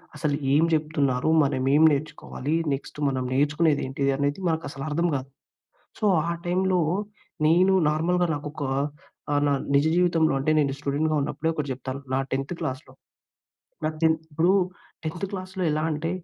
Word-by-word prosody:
అసలు 150 -3 0 0.2
ఏం 150 - +5
చెప్తున్నారు? 150 -4 +1
మనం 135 -2 0
ఏం 155 - +5
నేర్చుకోవాలి? 150 0 -3 0.2
నెక్స్ట్ 135 - -6
మనం 130 -1 -2
నేర్చుకునేదేంటి 145 -1 +1
అనేది 145 +5 -1
మనకు 160 -1 -1
అసలు 135 0 -7
అర్థం 170 +4 +1
కాదు. 130 0 -4 0.7
సో, 215 - 0 0.2
ఆ - - 0
టైంలో 185 0 +2 0.7
నేను 185 +4 +4 0.2
నార్మల్‌గా 175 +3 +1
నాకోక 145 +1 -6 0.7
ఆహ్, 145 0 +2
నా 145 - +3 0.2
నిజ 140 +2 +4
జీవితంలో 170 -4 +3
అంటే 150 - 0
నేను 140 -2 +1
స్టూడెంట్‌గా 150 +2 0
ఉన్నప్పుడే 160 +3 -1
ఒకటి 150 -3 -3
చెప్తాను. 130 +2 -6
నా - - +2
10థ్ 135 +5 -2
క్లాస్‌లో 130 0 -5 0.9
నా 155 - +2
టెన్ 160 0 +5 0.2
ఇప్పుడు 165 +4 +3 0.5
10థ్ 160 +3 -5
క్లాస్‌లో 185 -1 -5
ఎలా 155 +1 0
అంటే 155 +2 -2
150 Hz, 150 wpm, -25 LUFS, 140-165 Hz, 0.9 s, ఏం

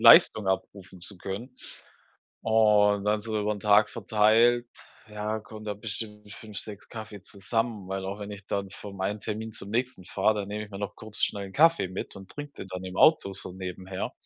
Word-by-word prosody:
Leistung 105 -3 +8
abrufen 95 -1 -3
zu 100 +3 -3
können. 115 +8 -6 0.9
Und 105 -2 +4
dann 105 0 +2
so 110 -1 -2
über 105 +1 +1
'n 105 - -6
Tag 105 0 +5
verteilt, 115 +3 +4 0.4
ja, 105 +1 -2
kommen 110 0 -10
da 105 -1 -2
bestimmt 105 0 -7
5, 105 -2 -8
6 105 -2 -8
Kaffee 110 -3 -8
zusammen, 105 0 -2
weil 95 0 -3
auch 100 +2 -4
wenn 100 0 -5
ich 100 -1 -9
dann 100 -1 -2
vom 100 -1 -9
einen 100 +2 -1
Termin 110 +1 -4
zum 100 -1 -7
nächsten 120 -4 -1
fahre, 100 +4 +2
dann 100 - -5
nehme 105 +1 -3
ich 105 - -15
mir 100 - -7
noch 100 -1 -4
kurz 110 -1 -4
schnell 100 -1 0
'n 95 - -11
Kaffee 165 - +5
mit 95 +2 -6
und 95 -1 -11
trinke 145 -1 -7
den - - -10
dann 95 0 -5
im 95 0 -6
Auto 155 -11 +5
so 95 -1 -6
nebenher. 95 0 -5
105 Hz, 200 wpm, -28 LUFS, 95-110 Hz, 0.9 s, Leistung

